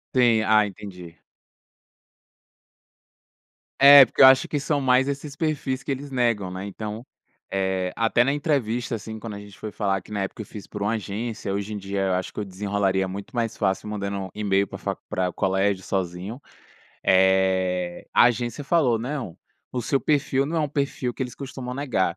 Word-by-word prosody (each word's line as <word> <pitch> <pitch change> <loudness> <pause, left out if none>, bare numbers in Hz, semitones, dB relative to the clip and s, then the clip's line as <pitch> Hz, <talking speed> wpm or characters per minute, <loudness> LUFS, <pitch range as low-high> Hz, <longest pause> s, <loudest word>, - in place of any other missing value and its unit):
Sim, 120 -4 +4
ah, 110 -1 +5
entendi. 90 -4 -10 2.6
É, 140 -1 +10
porque - - -1
eu - - +11
acho 130 0 +6
que 150 - -2
são 145 +1 0
mais 130 0 +3
esses 140 +1 -5
perfis 145 -4 -2
que - - -3
eles 140 +2 -4
negam, 115 -7 0
né, 95 +1 -6
então, 105 +4 -6 0.5
eh, 95 -1 -1
até 115 +1 +2
na 135 - +1
entrevista, 125 -6 -1
assim, 110 0 -7
quando 110 0 -7
a - - -7
gente 100 -2 -13
foi 110 - -5
falar, 100 -2 -1
que 105 - -12
na 100 - -1
época 95 - -6
eu - - -7
fiz 105 -1 -10
por 105 - -8
uma 105 +2 +1
agência, 110 -1 -4
hoje 100 +2 -3
em - - -3
dia 100 0 -3
eu 95 -1 +1
acho 90 0 -2
que - - -6
eu 105 - -2
desenrolaria 95 0 0
muito 100 +5 -7
mais 115 -1 -1
fácil 95 +2 -1
mandando 100 -2 -4
email 100 -2 +1
para - - -8
a - - -19
faculd - - -5
para 90 -1 0
o - - -9
colégio 95 0 0
sozinho, 95 +5 -3 0.7
eh, 95 -1 +2
a - - +7
agência 120 +4 0
falou: 135 -7 +2
"Não, 125 - -5 0.3
o 125 - -3
seu 135 +3 +1
perfil 140 -2 +1
não 165 +3 -3
é - - +2
um 150 - 0
perfil 140 -3 -2
que - - -4
eles 125 -1 -5
costumam 130 -2 -7
negar". 110 -10 0
105 Hz, 190 wpm, -24 LUFS, 95-130 Hz, 2.6 s, eu